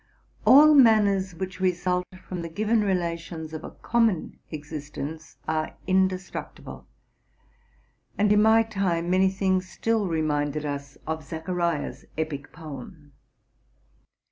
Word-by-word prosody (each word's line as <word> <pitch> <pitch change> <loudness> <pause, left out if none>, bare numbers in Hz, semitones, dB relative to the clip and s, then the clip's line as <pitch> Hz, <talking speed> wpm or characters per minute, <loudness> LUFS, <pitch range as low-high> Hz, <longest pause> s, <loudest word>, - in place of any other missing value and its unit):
All 300 +3 +9
manners 205 - +4
which 190 +2 -5
result 180 -1 0 0.2
from 180 -2 -4
the 165 - -5
given 215 +6 +1
relations 170 -4 -2
of 155 - -6
a - - -6
common 230 -7 0
existence 150 0 -7
are 155 0 -1
indestructible; 185 0 -2 1.3
and, 205 0 +4
in 210 - +5
my 220 +1 +6
time, 185 -6 -1
many 190 +1 +4
things 190 -1 0
still 225 -1 0
reminded 150 -2 -1
us 140 -1 -5
of 160 0 -3
Zacharia's 165 +1 -3
epic 150 -3 -4
poem. 150 -1 -10
175 Hz, 115 wpm, -26 LUFS, 155-195 Hz, 1.3 s, All